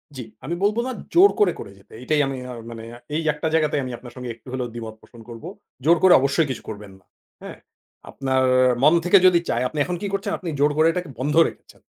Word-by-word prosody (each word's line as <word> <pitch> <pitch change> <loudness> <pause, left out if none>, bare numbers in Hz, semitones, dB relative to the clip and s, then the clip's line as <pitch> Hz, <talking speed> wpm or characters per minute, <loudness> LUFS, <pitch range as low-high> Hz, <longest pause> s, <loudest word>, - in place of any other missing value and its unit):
জ্বী। 125 - -6 0.2
আমি 170 - -3
বলব 210 +2 +1
না - - -3 0.2
জোর 375 +4 +7
করে, 195 -5 +3
করে 100 - -8
যেতে। 100 - -21
এটাই 150 +2 +1
আমি 135 -1 -4
আ - - -7 0.2
মানে 115 -1 -9 0.3
এই 160 - 0
একটা 150 +2 -3
জায়গাতে 155 -2 +1
আমি 130 - -5
আপনার 120 - -13
সঙ্গে 125 -1 -7
একটু 115 - -25
হলেও 125 -1 -3
দ্বিমত 110 -2 -7
পোষণ 120 -2 -16
করব। 115 +2 -10 0.4
জোর 170 +1 +5
করে 185 -2 +7
অবশ্যই 140 +3 +1
কিছু 130 - -7
করবেন 105 -2 -9
না। 90 - -33 0.4
হ্যাঁ? - - -9 0.5
আপনার 130 -1 -1 0.4
মন 150 - +6
থেকে 180 +3 +6
যদি 175 -2 +4
চায়, 120 - 0
আপনি 155 - -5
এখন 180 - -3
কি 205 - -3
করছেন? 200 +1 -2
আপনি 175 - -5
জোর 145 +1 +3
করে 155 +1 +4
এটাকে 175 -2 -5
বন্ধ 145 +3 -1
রেখেছেন। - - -19
145 Hz, 225 wpm, -22 LUFS, 125-175 Hz, 0.5 s, জোর